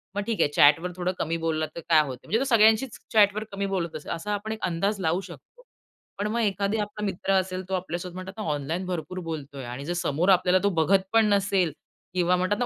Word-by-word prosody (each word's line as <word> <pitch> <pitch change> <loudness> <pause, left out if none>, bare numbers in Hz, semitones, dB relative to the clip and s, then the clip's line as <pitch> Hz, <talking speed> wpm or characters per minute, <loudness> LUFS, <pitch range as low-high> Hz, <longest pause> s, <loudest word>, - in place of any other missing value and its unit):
मग 205 - 0
ठीक 230 -2 0
आहे, - - +3
चॅट 145 +2 +7
वर 180 +2 -4
थोडं 180 0 -1
कमी 165 +1 -1
बोलला 155 -1 0
तर - - -5
काय 160 -2 +7
होतं? 130 -2 -6
म्हणजे 225 - +1
तो - - +1
सगळ्यांशीच 220 +3 +4 0.2
चॅट 205 -2 +5
वर 215 - -2
कमी 200 0 -2
बोलत 170 -3 -3
असेल, 155 - -6
असा 170 +5 -3
आपण 205 +2 -3
एक 220 - -4
अंदाज 195 +5 -1
लावू 170 +2 +1
शकतो. - - -15 0.5
पण 205 - -1
मग 235 - -1
एखादा 205 0 0
आपला 210 0 -5
मित्र 195 0 -1
असेल, 185 -1 0
तो - - -3
आपल्यासोबत 180 -1 -3
म्हणतात 185 +1 -7
ना 215 - -4
ऑनलाईन 155 +6 -3
भरपूर 180 0 -4
बोलतोय 145 -3 -6
आणि 125 +3 -6
जर 175 - -2
समोर 175 +1 0
आपल्याला 185 0 +4
तो 200 - +4
बघत 195 +5 +4
पण 225 -1 +5
नसेल 195 -4 +2 0.4
किंवा 180 0 +2
म्हणतात 185 +3 0
ना, 245 - +1
185 Hz, 230 wpm, -26 LUFS, 165-205 Hz, 0.5 s, चॅट